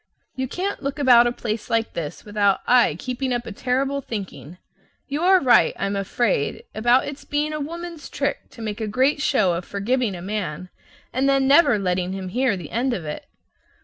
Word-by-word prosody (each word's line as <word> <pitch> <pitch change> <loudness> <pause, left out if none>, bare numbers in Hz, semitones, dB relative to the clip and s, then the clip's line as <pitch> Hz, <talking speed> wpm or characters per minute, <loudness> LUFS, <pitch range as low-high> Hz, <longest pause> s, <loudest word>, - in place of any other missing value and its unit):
You 260 0 -2
can't 385 +8 -3
look 275 0 -3
about 245 -4 +6
a - - +1
place 220 -2 -4
like 230 0 0
this 155 -3 -6
without 205 -2 +1
"aye 245 -11 +4
keeping 255 +4 -3
up 240 -1 -1
a - - -6
terrible 265 +6 -1
thinking." 180 - -7 0.5
You 290 +2 -3
are 375 +1 +5
right, 245 -6 +4
I - - -1
am 200 +1 -2
afraid, 195 -5 -1
about 240 +4 +3
its 290 0 -7
being 300 +1 -1
a 305 - -3
woman's 335 +1 -6
trick 280 0 -3
to 230 - -10
make 215 +1 -4
a 220 - -2
great 260 +7 +1
show 215 -11 +2
of 170 +1 -3
forgiving 210 +3 -1
a 175 - -8
man, 185 -4 -4 0.4
and 265 +2 +2
then 270 -1 +3
never 280 -5 +5
letting 180 -1 -1
him 190 -1 -5
hear 245 0 +1
the 170 -5 -9
end 245 +2 0
of 170 - -6
it. 150 - -6
240 Hz, 200 wpm, -23 LUFS, 200-275 Hz, 0.5 s, about